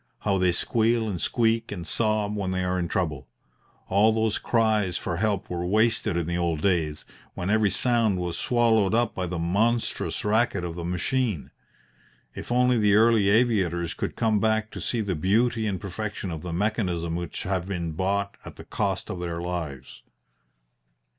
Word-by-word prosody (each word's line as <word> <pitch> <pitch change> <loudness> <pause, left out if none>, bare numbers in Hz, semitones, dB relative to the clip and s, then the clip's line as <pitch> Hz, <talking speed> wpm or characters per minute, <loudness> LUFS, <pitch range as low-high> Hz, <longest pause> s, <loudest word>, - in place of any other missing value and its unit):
How 100 -2 +1
they 90 -1 +3
squeal 115 +5 +1
and 95 -5 -3
squeak 115 -1 +1
and 90 -5 -5
sob 110 +2 0
when 100 -3 -2
they 95 0 -1
are 90 0 0
in 85 - -1
trouble! 75 -7 -2 0.6
All 105 +4 +4
those 110 -1 0
cries 110 -6 +1
for 85 -2 -3
help 100 0 0
were 85 -1 -3
wasted 105 0 +2
in 85 - -1
the 85 +1 -2
old 85 -3 -1
days, 80 -6 0 0.3
when 90 +3 -2
every 110 -1 +3
sound 110 +1 +2
was 90 -1 -3
swallowed 115 -4 +2
up 120 -1 +1
by 90 -1 -3
the 90 +1 -4
monstrous 105 +10 0
racket 105 -3 +1
of 85 -1 -4
the 85 0 -6
machine. 90 - -1 0.8
If - - -8
only 125 0 +3
the 105 -1 +4
early 110 -2 +4
aviators 95 -7 +2
could - - -4
come 110 -3 +2
back 110 0 +1
to - - -7
see 120 - -1
the 100 -3 -1
beauty 110 +7 +1
and 95 -3 -2
perfection 100 -1 -5
of 80 -2 -5
the 90 - -6
mechanism 90 -3 -1
which 85 -1 -4
have 95 -2 -2
been 85 -4 -3
bought 100 +4 -1
at - - -10
the - - -11
cost - - -2
of 90 - -5
their 85 -1 -4
lives! 80 -7 -5
100 Hz, 180 wpm, -26 LUFS, 85-110 Hz, 0.8 s, All